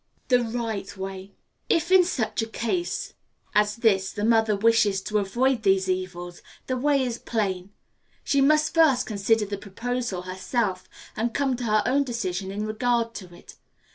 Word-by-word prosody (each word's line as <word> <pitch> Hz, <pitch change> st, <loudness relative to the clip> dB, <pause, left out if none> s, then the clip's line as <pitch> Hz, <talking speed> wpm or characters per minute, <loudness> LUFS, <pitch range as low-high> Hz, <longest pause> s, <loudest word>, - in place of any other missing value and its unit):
The 250 Hz, -1 st, +5 dB
Right 225 Hz, -4 st, -4 dB
Way. 190 Hz, 0 st, -7 dB, 0.3 s
If 340 Hz, +2 st, +1 dB
in 375 Hz, -1 st, +7 dB
such 255 Hz, -11 st, -1 dB
a 225 Hz, -, -3 dB
case 235 Hz, +11 st, -3 dB, 0.4 s
as 210 Hz, 0 st, +2 dB
this 200 Hz, -5 st, +2 dB
the 205 Hz, -, -3 dB
mother 225 Hz, -2 st, +3 dB
wishes 210 Hz, -2 st, +3 dB
to 215 Hz, 0 st, 0 dB
avoid 240 Hz, +5 st, +1 dB
these 190 Hz, -2 st, +2 dB
evils, 180 Hz, -1 st, -4 dB, 0.2 s
the 255 Hz, -, -1 dB
way 275 Hz, +1 st, +2 dB
is 240 Hz, -2 st, -3 dB
plain. 195 Hz, -5 st, -2 dB, 0.5 s
She 280 Hz, -, +2 dB
must 305 Hz, +3 st, +3 dB
first 315 Hz, -6 st, +4 dB
consider 215 Hz, +1 st, +1 dB
the 200 Hz, 0 st, -5 dB
proposal 230 Hz, -1 st, -4 dB
herself, 185 Hz, +1 st, -2 dB, 0.3 s
and 230 Hz, +1 st, -2 dB
come 275 Hz, -2 st, +1 dB
to 245 Hz, -, -4 dB
her 215 Hz, -1 st, +2 dB
own 275 Hz, +3 st, +2 dB
decision 195 Hz, -7 st, -3 dB
in 205 Hz, +2 st, -3 dB
regard 230 Hz, +1 st, 0 dB
to 185 Hz, -5 st, -9 dB
it. -, -, -15 dB
220 Hz, 165 wpm, -25 LUFS, 195-245 Hz, 0.5 s, in